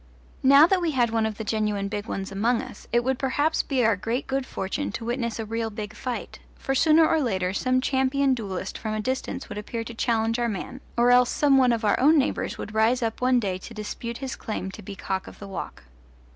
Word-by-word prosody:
Now 280 +3 +8
that 370 +1 +2
we 330 -3 0
had 240 -3 +2
one 225 -1 +1
of 215 -2 -5
the 220 - -4
genuine 210 -2 -1
big 205 +1 -4
ones 195 -3 -4
among 225 +5 +1
us - - -9
it 240 0 +3
would 260 +1 0
perhaps 290 +4 +1
be 260 -4 0
our 225 -1 +4
great 230 +7 -2
good 270 0 -2
fortune 195 +10 -3
to 230 - -5
witness 235 -1 -2
a 225 - -4
real 225 +1 -2
big 215 0 -6
fight; 245 +1 -5 0.2
for 270 - -2
sooner 315 +3 +5
or 320 -1 +2
later 190 -7 0
some 255 +4 +1
champion 265 +1 +2
duellist 195 -6 -4
from 215 -1 -3
a - - -2
distance 260 +4 -3
would 205 - -6
appear 230 +2 -4
to 235 - -8
challenge 225 0 0
our 240 -1 +1
man, 230 +6 -5 0.2
or 240 +1 +5
else 250 0 +5
some 285 -2 +3
one 255 -2 +4
of 230 -1 0
our 205 - +3
own 305 +5 +5
neighbours 280 0 0
would 215 - -7
rise 225 +3 +2
up 225 +1 -2
one 250 0 +4
day 190 -5 -2
to 230 +4 -10
dispute 235 +2 -5
his 265 -1 -5
claim 190 -3 -4
to - - -10
be 195 +1 -8
cock 190 -1 -3
of - - -11
the 200 - -9
walk. 195 -2 -7
235 Hz, 240 wpm, -25 LUFS, 215-260 Hz, 0.2 s, Now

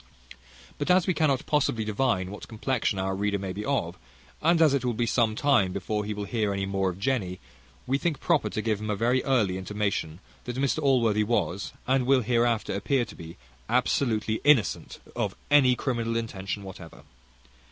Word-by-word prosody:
But - - -2
as 180 0 +5
we 185 - +1
cannot 145 -4 +1
possibly 135 -7 +1
divine 105 -4 0
what 105 - -9
complection 115 -2 -1
our 95 0 -1
reader 100 +1 0
may 95 -1 -5
be 105 - -5
of, 95 -11 -2 0.4
and 165 +1 +3
as 155 -4 +5
it 140 -3 0
will 120 -2 -1
be 120 - 0
some 115 -1 +1
time 120 -9 +3
before 105 +2 -2
he 105 - -3
will 105 - -4
hear 110 -2 -1
any 100 0 -2
more 95 -1 0
of 90 - -6
Jenny, 100 -5 -1 0.5
we 135 +2 0
think 155 -4 -1
proper 170 -4 +1
to 110 - -3
give 110 -2 -1
him 110 - -4
a 105 - 0
very 120 +5 +1
early 105 -9 +1
intimation, 100 -4 -2 0.3
that 125 - -4
Mr 140 +3 0
Allworthy 115 -7 +3
was, 100 -4 -1
and 130 -1 +1
will 135 -1 +4
hereafter 115 0 +1
appear 120 +6 0
to - - -12
be, 85 0 -10 0.3
absolutely 115 -3 +1
innocent 145 -7 +2 0.2
of - - -2 0.2
any 135 -4 +6
criminal 115 -2 -1
intention 100 -3 -4
whatever. 90 -3 -11
115 Hz, 185 wpm, -27 LUFS, 100-130 Hz, 0.5 s, any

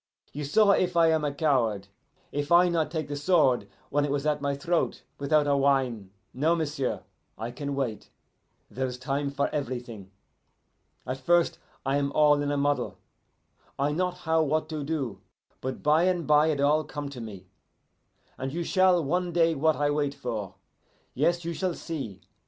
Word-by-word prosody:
You 150 0 -4
saw 200 +8 +4
if 180 -3 +1
I 165 -1 +5
am 150 -2 +1
coward 120 - +1 0.4
if 145 +2 -3
I 175 +1 +6
not 165 -3 0
take 155 -2 -3
the 145 - -4
sword 145 -5 +2 0.2
when 145 +1 +2
it 145 - -1
was 140 +1 -1
at 150 -1 +1
my 140 0 0
throat 170 +4 -1 0.2
without 150 +1 +2
a 145 -1 +2
whine. 135 -7 +1 0.2
No, 155 +6 +2
m'sieu', 145 -5 -2 0.4
I 115 +3 -4
can 140 +2 -4
wait. 125 -7 -3 0.6
Then 130 +1 -3
is 125 -1 -6
a - - -24
time 140 +2 -1
for 140 0 0
everything. 120 -8 -5 1.0
At 130 +1 -3
first 170 +5 +2 0.3
I 135 +1 +1
am 140 -1 0
all 150 -1 +4
in 145 - -1
a 145 - 0
muddle, 145 0 0 0.8
I 140 +2 +1
not 180 +3 -1
how 160 -2 +1
what 155 +1 0
to 155 -2 -4
do; 140 -7 -3 0.4
but 130 0 -5
by 155 +3 +4
and 180 -3 +1
bye 150 +1 +5
it 155 -3 0
all 150 +2 +3
come 145 -1 -6
to 130 -3 -8
me, 100 -5 -9 0.9
and 130 +1 -3
you 170 +4 -2
shall 185 -1 +3
one 175 +5 0
day 165 -1 +3
what 155 +1 +2
I 145 0 +1
wait 145 -1 -1
for. 115 -8 -5 0.6
Yes, 170 +5 +1
you 170 - -2
shall 180 0 -2
see. 125 - -6
145 Hz, 180 wpm, -27 LUFS, 135-160 Hz, 1.0 s, I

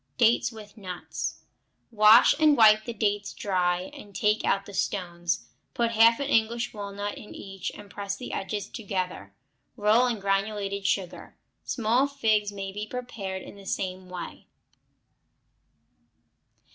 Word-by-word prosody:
Dates 235 +1 +3
with 215 -2 -12
Nuts 185 -4 -5 0.5
Wash 215 +1 +7
and 305 -2 +5
wipe 215 -1 +6
the 235 - -3
dates 205 -1 -1
dry, 180 -3 0
and 200 -2 -12
take 210 +2 +2
out 195 0 +1
the 200 - -11
stones. 175 -3 -2 0.3
Put 235 -1 +1
half 230 +1 +5
an 280 - -1
English 235 -3 +1
walnut 205 -1 -5
in 210 - -11
each 195 -1 -6
and 205 - -11
press 200 0 -4
the - - -7
edges 205 +1 -3
together; 185 - -4 0.5
roll 220 +4 +4
in 235 -3 -1
granulated 200 0 -1
sugar. 185 -3 -2 0.3
Small 240 +3 +2
figs 220 -7 +1
may 195 -1 -5
be 210 +2 -5
prepared 210 -6 -5
in - - -10
the 200 -1 -14
same 185 -1 -3
way. 180 -1 -8
205 Hz, 140 wpm, -27 LUFS, 195-225 Hz, 0.5 s, Wash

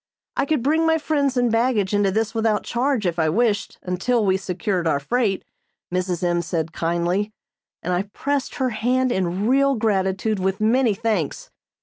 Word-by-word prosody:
I 275 - 0
could 300 -6 +1
bring 320 +4 +2
my 320 0 +4
friends 285 -4 0
and 245 -2 +2
baggage 225 -4 +1
into 205 -1 +3
this 220 +3 -1
without 220 -2 +1
charge, 245 -2 0
if 175 -1 -1
I 160 -1 +2
wished, 210 +3 0
until 210 +6 0
we 190 -1 +3
secured 185 -1 -2
our 145 -3 +2
freight, 210 - 0 0.5
Mrs. 180 -1 -1
M. 175 -1 +1
said 165 -1 -3
kindly, 175 +5 0 0.5
and 180 - -1
I 190 +3 -1
pressed 280 +2 -2
her 260 -1 0
hand 250 +3 +1
in 190 0 -1
real 275 +2 +3
gratitude 205 -1 0
with 190 +2 -1
many 225 0 +3
thanks. 210 -8 -2
210 Hz, 175 wpm, -22 LUFS, 185-250 Hz, 0.5 s, my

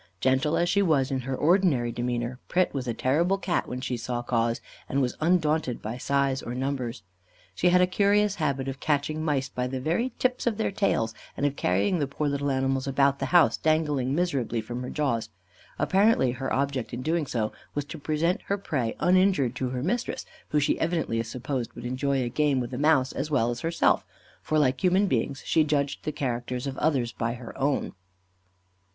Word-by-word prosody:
Gentle 130 +6 +2
as 175 - +2
she 200 +3 +3
was 145 -7 +2
in 135 - 0
her 130 +1 -3
ordinary 150 -7 +3
demeanour, 120 +1 -2
Pret 185 0 +1
was 130 -3 -3
a 120 - 0
terrible 170 +11 +2
Cat 185 -2 -1
when 125 +1 -5
she 125 - -2
saw 120 +1 -3
cause, 115 -1 0 0.3
and 140 - +1
was 125 -3 0
undaunted 155 -6 +1
by 115 +4 -5
size 140 0 +1
or 120 - -5
numbers. 125 -4 -3 0.5
She 180 - +2
had 180 +1 +5
a - - +6
curious 200 +2 +2
habit 140 -5 -1
of 135 0 -4
catching 155 +1 0
mice 140 -4 0
by 125 -1 -3
the 130 +1 -3
very 170 - 0
tips 250 -1 0
of 220 -3 +1
their 220 - 0
tails, 115 - 0 0.2
and 145 - 0
of 145 -1 0
carrying 100 - +1
the 145 - 0
poor 145 +2 -2
little 140 0 -1
animals 135 0 0
about 140 +1 +2
the 135 - -1
house, 175 +1 +5
dangling 150 -4 +1
miserably 140 -10 0
from 120 +3 -5
her 125 - -5
jaws. 120 -7 -1 0.5
Apparently 195 - +3
her 130 +2 -4
object 135 -3 -1
in 125 - -5
so - - -7 0.4
doing 110 - -2 0.2
was 145 -1 -1
to - - -8
present 165 +6 0
her 200 - 0
prey 130 - -2
uninjured 180 -9 +3
to 130 - -1
her 125 0 -3
mistress, 235 +9 -2 0.2
who 150 - +1
she 145 - +1
evidently 160 -9 0
supposed 120 +1 -4
would 120 - -8
enjoy 130 +2 0
a - - -2
game 140 +2 +1
with 120 0 -4
a - - -3
mouse 145 -3 +3
as 145 +3 -3
well 120 -5 +2
as 120 - -4
herself, 165 +4 +2 0.4
for 155 - 0
like 130 +1 +2
human 185 +2 +4
beings 135 - -1
she 160 - +3
judged 145 -2 -1
the 155 - 0
characters 125 -3 -3
of 135 -1 -3
others 135 -7 +1
by 115 +1 -2
her 120 -2 -9
own. 140 +1 0
140 Hz, 200 wpm, -27 LUFS, 125-160 Hz, 0.5 s, a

